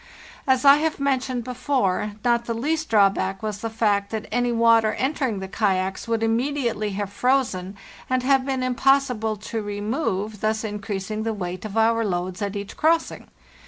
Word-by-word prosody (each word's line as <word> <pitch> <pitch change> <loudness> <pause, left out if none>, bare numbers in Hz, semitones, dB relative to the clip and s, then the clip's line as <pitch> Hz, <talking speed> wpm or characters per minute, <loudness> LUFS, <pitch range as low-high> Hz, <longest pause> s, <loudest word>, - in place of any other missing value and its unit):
As 260 0 +2
I 280 +1 +9
have 315 0 -1
mentioned 260 -3 0
before, 250 -5 -1
not 235 -1 +2
the 230 - -2
least 310 +6 -1
drawback 195 -2 +2
was 210 -2 -3
the 225 - -3
fact 205 -3 +1
that 220 -1 -4
any 245 +1 +1
water 230 -1 +4
entering 265 -5 -1
the 190 0 -5
kayaks 190 -1 -1
would 225 -1 0
immediately 235 -2 0
have 200 0 -4
frozen 220 -8 0 0.3
and 255 -1 +1
have 270 0 +3
been 265 -1 -2
impossible 255 -3 +2
to 220 +2 -5
remove, 205 0 -3
thus 215 +1 0
in 210 -1 -4
creasing 205 +1 -4
the 220 0 -2
weight 180 0 -5
of 215 0 -5
our 230 +1 +3
loads 185 -1 -3
at 200 0 -2
each 200 0 -6
crossing. 325 +1 +1
225 Hz, 170 wpm, -23 LUFS, 205-255 Hz, 0.3 s, I